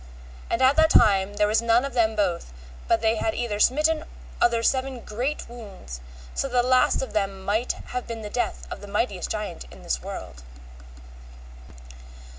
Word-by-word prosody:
And 245 - +1
at 265 +3 +5
that 315 0 +6
time 200 -5 +4
there 210 - +3
was 215 +2 +2
none 235 +2 +3
of 275 - -5
them 225 -3 +2
both 180 - -1 0.4
but - - +3
they 220 0 +3
had 330 +8 -1
either 225 -4 -2
smitten 310 +6 +3 0.4
other 235 -1 +3
seven 260 0 0
great 250 +9 -3
wounds, 200 - -10 0.3
so - - -1
that 245 -2 +2
the - - -2
least 255 0 +3
of 235 -5 -7
them 195 -2 -2
might 220 +5 +1
have 250 0 -6
been 230 -1 -6
the 210 - -5
death 245 - -2
of - - -6
the 205 - -9
mightiest 200 -2 -1
giant 210 - -4
in - - -13
this - - -1
world. 65 -1 -8
230 Hz, 180 wpm, -25 LUFS, 205-250 Hz, 0.4 s, that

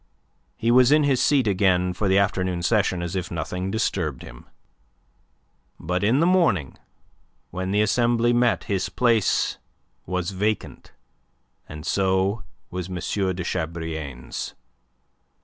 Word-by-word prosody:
He 115 - +1
was 125 +2 +6
in 150 0 +5
his 135 -3 +2
seat 140 -4 +3
again 90 -3 +2
for 100 +3 -2
the 95 0 +3
afternoon 90 -3 0
session 95 -4 +1
as 85 +2 -4
if 90 -1 -3
nothing 90 +3 -4
disturbed 90 - -2
him. - - -12 1.3
But 90 +4 -2
in 115 +7 +3
the 165 - +3
morning, 165 - +2 0.8
when 95 +1 -4
the 105 +2 +2
Assembly 120 +1 +2
met, 120 0 +2
his 100 -4 -2
place 115 -5 +1 0.5
was 90 0 -2
vacant, 105 +2 -3 0.8
and 75 +1 -8
so 95 +3 +1 0.3
was 90 0 -5
M. 90 - -5
de 95 0 -2
Chabrillane's. 80 -7 -5
95 Hz, 130 wpm, -24 LUFS, 90-115 Hz, 1.3 s, was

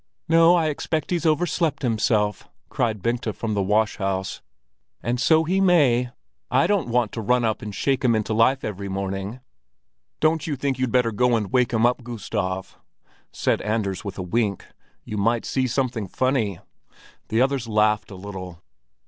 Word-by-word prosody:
"No, 165 +1 +6
I 165 -3 +2
expect 155 +1 -3
he's 170 -2 +1
overslept 160 -1 0
himself," 110 -3 0 0.2
cried 110 -5 -1
Bengta 120 -2 -1
from 110 0 -3
the 100 - 0
wash 105 +3 +1
house. 95 -1 -2 0.6
"And 120 +2 -1
so 160 +3 +4
he 185 +4 +1
may! 140 -10 +4 0.4
I 130 +2 +3
don't 200 -8 +1
want 120 -2 +1
to 115 - -4
run 125 +3 +2
up 110 -1 -1
and 105 - -5
shake 135 +7 0
life 120 -3 +3
into 110 0 -1
him 115 +5 +4
every 100 -1 -4
morning!" 95 +4 -4 0.8
"Don't 155 0 +1
you 150 - -1
think 135 -1 -2
you'd 130 -2 0
better 125 -2 +2
go 125 +3 +2
up - - +4
and 105 -3 -4
wake 125 -2 +3
him, 115 0 +2 0.2
Gustav?" 105 -5 -4 0.5
said - - 0
Anders 105 -3 -2
with 100 -3 -6
a 95 - -3
wink. 100 +1 -1 0.4
"You 105 - -5
might 115 +3 +1
see 130 -1 0
something 125 -4 -1
funny." 120 -4 0 0.7
The 115 +3 +2
others 135 -3 -1
laughed 105 -1 +2
a 100 - -9
little. 95 -3 -8
115 Hz, 175 wpm, -23 LUFS, 105-135 Hz, 0.8 s, No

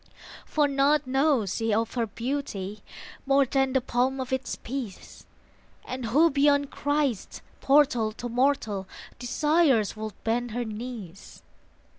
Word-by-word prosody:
For 300 -2 +2
naught 280 +1 +2
knows 265 - +1
she 225 -1 0
of 225 +2 0
her 235 -2 -1
beauty, 215 -4 -4 0.5
More 275 0 +4
than 270 0 +1
the 265 - +3
palm 255 +2 0
of 260 0 -3
its 260 0 -2
peace; 240 -6 -7 0.6
And 255 -2 -5
who 305 +9 +4
beyond 285 0 +3
Christ's 290 -7 -1 0.2
portal 265 -6 +3
to 240 - -6
mortal 235 -6 0 0.3
Desires 270 - +2
would 215 -1 -5
bend 240 +2 0
her 245 - -1
knees? 215 -4 -8
255 Hz, 130 wpm, -27 LUFS, 225-280 Hz, 0.6 s, More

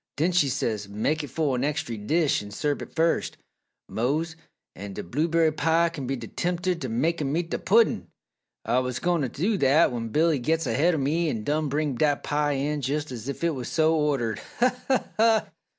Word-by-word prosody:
"Den 165 +5 +2
she 170 -6 +3
says, 110 -6 -2
'Mek 145 +10 -1
it - - -5
fo' 155 -4 0
an 125 0 -1
extry 140 -5 -2
dish 150 +9 +1
an' 105 - -9
serb 145 +7 -2
it - - -9
fust, 165 +1 +1 0.5
Mose, 155 +8 -1 0.4
an' 100 +1 -7
d' - - -5
blue 155 +5 +1
berry 165 -1 +3
pie 165 +2 +2
kin 140 -6 -6
be 135 +1 -1
t' - - -7
tempter 180 +1 -1
t' 165 -7 -5
make 155 +9 0
'em 145 +2 0
eat 170 -1 -3
d' - - 0
puddin'!' 200 - +3 0.6
"Ah 125 +2 +2
wuz 125 0 -3
goin' 175 -2 +1
t' 135 - 0
do 190 - -1
dat 140 +4 +4
when 115 -2 -4
Billy 155 +4 +2
gits 160 +6 0
ahaid 150 +8 +2
o' - - -1
me 155 +4 0
an' 115 -6 -3
done 150 +3 0
bring 145 0 0
dat 145 +3 +1
pie 145 0 0
in 145 +2 -1
jes' 145 +2 -2
es 120 +1 -6
ef 140 - -5
it 170 -1 +2
wuz 130 -3 -5
so 160 0 +2
ordered! 135 -8 0 0.2
Ha, 250 +1 +3
ha, 260 -1 +1
ha!" 225 0 +3
150 Hz, 215 wpm, -26 LUFS, 130-165 Hz, 0.6 s, dat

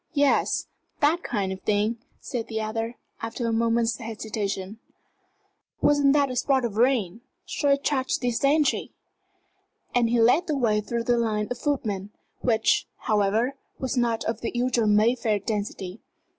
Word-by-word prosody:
"Yes 285 -1 +2 0.3
that 310 +4 +3
kind 200 - -2
of 190 - -6
thing," 215 +2 0 0.2
said 240 -5 -4
the 220 -1 -3
other, 225 +2 -3 0.3
after 230 +2 -4
a 230 - 0
moment's 230 0 +1
hesitation. 215 -3 -4 1.0
"Wasn't 285 -1 +4
that 285 -2 +2
a - - -4
spot 265 0 +2
of 220 -4 -4
rain? 230 -5 +2 0.2
Shall 295 -6 +1
I - - +5
charge 275 -2 0
these 245 -2 -1
gentry?" 290 +1 +2 1.0
And 240 -2 +3
he 240 0 +2
led 250 +10 +4
the 305 -3 0
way 215 -5 +2
through 235 +2 -3
the 240 0 +2
line 215 -2 0
of 245 - -3
footmen, 210 -9 -2 0.3
which, 220 -2 +2
however, 215 +5 +1 0.2
was 260 -1 -3
not 235 -2 +1
of 225 0 -3
the 235 - -2
usual 240 -2 +1
Mayfair 215 +1 +3
density. 200 -1 -4
230 Hz, 155 wpm, -25 LUFS, 215-255 Hz, 1.0 s, I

